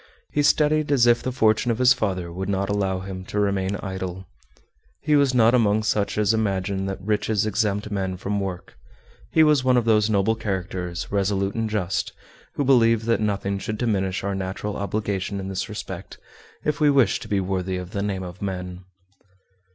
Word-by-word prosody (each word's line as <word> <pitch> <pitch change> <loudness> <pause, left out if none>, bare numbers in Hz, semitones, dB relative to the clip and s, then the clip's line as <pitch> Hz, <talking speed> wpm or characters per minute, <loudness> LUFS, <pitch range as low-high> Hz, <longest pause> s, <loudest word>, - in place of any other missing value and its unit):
He 145 - +1
studied 150 +1 +3
as 130 -4 +4
if 120 0 +4
the 130 - -2
fortune 110 -1 +2
of 115 - +1
his 125 +1 +6
father 95 -7 -2
would 95 +2 -4
not 100 0 -1
allow 95 -2 0
him 95 -1 -6
to 105 - -3
remain 100 -1 0
idle. 95 -1 -5 0.8
He 150 0 +3
was 140 -3 +3
not 115 -1 +5
among 110 -3 +3
such 105 -1 0
as 105 +1 +3
imagine 95 -3 -1
that 95 0 -4
riches 105 +1 0
exempt 105 -1 -1
men 95 -2 -2
from 100 +2 -2
work 95 -3 -6 0.5
he 160 - +5
was 150 -4 +4
one 130 -1 +4
of 120 - +1
those 110 -1 +3
noble 105 +1 +2
characters, 95 -5 -4
resolute 100 -1 0
and 115 -1 -2
just, 100 -3 -2 0.4
who 145 - 0
believe 115 -4 +4
that 115 -1 +1
nothing 100 -2 -1
should 110 +2 -4
diminish 100 -5 -1
our 100 0 -1
natural 95 +2 -4
obligation 100 -1 -2
in 95 0 -5
this 95 - -3
respect - - -7 0.5
if 150 -1 0
we 150 -1 +4
wish 135 -8 +3
to - - -9
be 100 - +1
worthy 95 -1 -2
of 90 0 -7
the 100 - -2
name 100 -2 -2
of 90 +1 -9
men. 90 -2 -5
100 Hz, 190 wpm, -24 LUFS, 95-115 Hz, 0.8 s, his